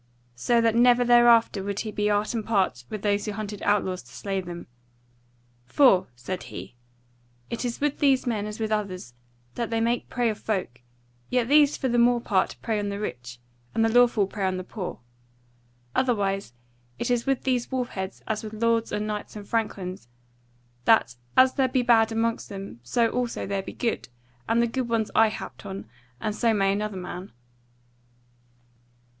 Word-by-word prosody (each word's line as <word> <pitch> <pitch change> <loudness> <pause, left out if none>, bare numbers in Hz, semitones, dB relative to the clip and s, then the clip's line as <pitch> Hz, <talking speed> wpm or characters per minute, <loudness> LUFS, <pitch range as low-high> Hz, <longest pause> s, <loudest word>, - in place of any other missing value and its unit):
So 230 - +2
that 230 -1 +3
never 245 +1 +5
thereafter 240 -3 +5
would 200 +1 -3
he 215 - -4
be 210 0 0
art 205 +2 +1
and 225 -2 -2
part 190 - 0
with 215 -2 -6
those 205 -1 +1
who 210 - -3
hunted 205 -1 -5
outlaws 190 -3 +1
to 125 - -18
slay 195 +4 -3
them. 175 -1 -8 1.0
"For," 220 - +5
said 180 +10 -5
he, - - -9 0.8
"it 235 - -3
is 240 -1 -3
with 295 0 0
these 270 -3 +3
men 215 -4 -1
as 210 +1 -7
with 220 -1 -2
others, 185 - -3 0.4
that 235 - -3
they 225 0 0
make 235 +2 0
prey 245 -2 +1
of 210 - -8
folk; 180 - -3 0.5
yet 250 -2 +1
these 295 0 +5
for 265 - -1
the 240 -1 +2
more 240 0 +4
part 200 -5 0
prey 220 -2 0
on 205 0 -2
the 200 0 -4
rich, 125 -10 -6 0.4
and 225 - +3
the - - +3
lawful 240 -4 +5
prey 195 +1 -5
on 185 0 -1
the 185 - -4
poor. 185 -1 -6 1.0
Otherwise 200 - 0 0.4
it - - -2
is 245 +1 0
with 270 -1 +1
these 250 -2 0
wolfheads 220 -7 -4
as 215 0 -2
with 215 0 -7
lords 230 +1 +1
and 210 - -1
knights 210 0 -5
and 205 -1 -8
franklins, 190 - -3 0.8
that 120 - +4 0.2
as 260 0 +7
there 265 -2 +2
be 255 0 +1
bad 230 -2 +4
amongst 225 +1 -1
them, 195 - -8
so 230 - +1
also 245 -1 -2
there 195 0 -2
be - - -8
good; 230 - -2 0.4
and 230 +1 +3
the - - +4
good 245 +1 -3
ones 225 -2 0
I 225 0 +6
happed 215 - -7
on, 195 -1 -6 0.3
and 210 +8 -2
so 230 0 +2
may 195 -1 +2
another 210 -1 -3
man." 180 +1 -7
215 Hz, 185 wpm, -26 LUFS, 195-235 Hz, 1.0 s, as